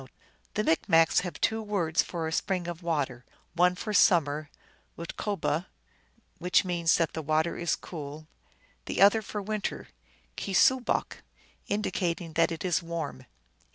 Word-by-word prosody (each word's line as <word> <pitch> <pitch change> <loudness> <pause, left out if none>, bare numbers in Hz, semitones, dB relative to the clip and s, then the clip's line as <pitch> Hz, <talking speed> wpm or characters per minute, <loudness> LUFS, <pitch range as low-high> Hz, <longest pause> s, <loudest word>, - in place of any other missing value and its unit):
2 - - -14 0.3
" - - -36
The 215 - +1
Micmacs 165 -2 +4
have 180 -2 -6
two 220 0 +1
words 185 -7 +1
for 165 -2 -4
a - - -3
spring 180 +1 -1
of 175 0 -5
water: 145 -8 -2 0.3
one 180 +1 +3
for 215 +3 -4
summer, 155 -6 +3 0.5
utkuboh, 170 -1 -2 0.7
which 180 +3 +3
means 170 -2 +2
that 165 -2 0
the 160 - -3
water 155 +2 +1
is 170 -1 0
cool; 155 -2 -8 0.6
the - - -3
other 205 +3 +6
for 210 0 -5
winter, 210 0 -3 0.5
keesoobok, 240 +6 +2 0.5
indicating 175 -5 -2
that 165 +1 +3
it 165 +2 -4
is 180 -1 +1
warm." 165 -7 -5
170 Hz, 145 wpm, -28 LUFS, 160-195 Hz, 0.7 s, other